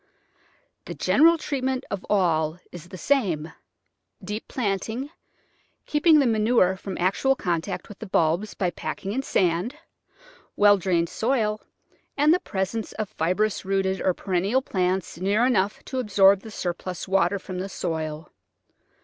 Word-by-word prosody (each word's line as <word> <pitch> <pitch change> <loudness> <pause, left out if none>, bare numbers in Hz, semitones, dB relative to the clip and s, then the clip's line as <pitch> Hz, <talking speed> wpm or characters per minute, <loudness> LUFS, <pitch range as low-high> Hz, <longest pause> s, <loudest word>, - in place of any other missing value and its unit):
The - - -7
general 330 +3 +4
treatment 265 -3 -2
of 200 -1 -3
all 165 -5 +1
is 175 -1 -10
the 185 - -9
same: 175 - 0 0.7
deep 210 +4 -5
planting, 225 - -3 0.7
keeping 305 +1 +4
the 285 - +4
manure 220 -4 +3
from 190 0 -7
actual 200 +9 +2
contact 175 -3 -3
with 205 - -12
the 220 - -7
bulbs 175 +4 +1
by 180 -2 0
packing 195 - -5
in 260 +5 -1
sand; 185 - 0 0.8
well 205 0 +6
drained 175 -3 0
soil 220 -3 0 0.6
and 295 +2 +5
the 360 - +2
presence 205 - -3
of 215 -2 -4
fibrous 205 +3 0
rooted 190 -1 0
or 185 - +1
perennial 195 +7 0
plants 185 -4 -1
near 200 +6 +2
enough 205 -5 0
to 260 - -3
absorb 200 -4 +5
the 220 - -11
surplus 180 -2 -5
water 195 +1 +2
from 185 -1 -7
the 190 +2 -4
soil. 160 -4 -4
195 Hz, 140 wpm, -25 LUFS, 180-230 Hz, 0.8 s, well